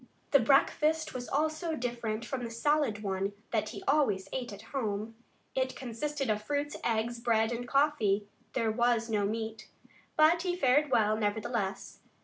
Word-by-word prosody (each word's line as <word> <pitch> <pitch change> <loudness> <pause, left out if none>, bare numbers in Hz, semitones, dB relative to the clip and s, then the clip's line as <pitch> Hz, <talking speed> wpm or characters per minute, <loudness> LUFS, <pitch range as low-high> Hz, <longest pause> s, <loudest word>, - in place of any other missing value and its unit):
The 280 - +7
breakfast 300 +5 +3
was 245 -1 -5
also 315 +1 0
different 235 -3 -3
from 255 +1 -4
the 235 - -3
solid 235 -2 +1
one 195 0 -1 0.2
that 215 -2 0
he - - -8
always 215 -10 +2
ate 250 -3 -3
at 200 +1 -9
home. 220 -4 -2 0.4
It 260 0 -1
consisted 275 +3 -3
of 210 0 -1
fruits, 290 +5 -2
eggs, 230 +1 0
bread 225 -1 +2
and 240 +1 -4
coffee. 235 -8 +2 0.3
There 230 -3 +1
was 235 0 +1
no 205 -2 +2
meat. 220 +1 -4 0.5
But 315 +2 +5
he 360 -1 -1
fared 290 -2 +3
very - - -14
well, 215 -2 +3
nevertheless. 210 -1 -2
235 Hz, 160 wpm, -31 LUFS, 215-280 Hz, 0.5 s, The